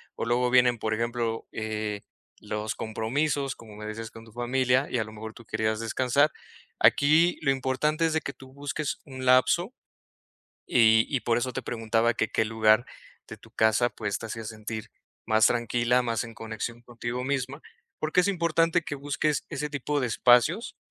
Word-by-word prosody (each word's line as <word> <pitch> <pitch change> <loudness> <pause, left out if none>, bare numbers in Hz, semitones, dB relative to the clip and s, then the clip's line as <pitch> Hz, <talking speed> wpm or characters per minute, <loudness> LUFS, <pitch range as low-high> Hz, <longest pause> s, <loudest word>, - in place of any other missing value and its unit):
o - - -4
luego 125 +1 +2
vienen, 125 -1 +5
por 110 0 -1
ejemplo, 115 0 -2
eh, 110 -1 -3 0.4
los 105 0 -4
compromisos, 135 +5 -1
como 110 -2 -13
me 105 - -8
decías 110 +1 -6
con 115 0 -12
tu 115 - -17
familia, 125 +2 +1
y - - 0
a 110 - +1
lo 110 - -11
mejor 110 +1 -8
tú 115 - -14
querías 110 0 -1
descansar, 130 +5 +2 0.5
aquí 155 +5 +4
lo 135 - +2
importante 135 +4 0
es 165 - +1
de 160 - +2
que 140 - -5
tú 130 -1 -15
busques 145 +1 -3
un 130 -3 -8
lapso 130 - +4 0.9
y 110 -2 +5
y 135 - 0
por 115 -1 +1
eso 130 +1 -1
te - - -3
preguntaba 115 0 0
que 110 - -1
qué 110 - +1
lugar 110 +1 +3 0.4
de - - -8
tu - - -18
casa, 110 +2 +3
pues, 105 -4 -3
te 115 - -6
hacía 115 0 -6
sentir 110 0 -6 0.3
más 110 0 +5
tranquila, 120 +1 +1
más 115 -2 -1
en 115 -1 -9
conexión 115 +1 -6
contigo 120 +1 -5
misma, 140 +1 -2 0.4
porque, 155 +3 +2
es 180 - 0
importante 170 -1 +2
que 145 - -4
busques 145 +1 -1
ese 150 -1 -3
tipo 145 0 -2
de 125 - 0
espacios 125 - +3
120 Hz, 180 wpm, -27 LUFS, 110-140 Hz, 0.9 s, vienen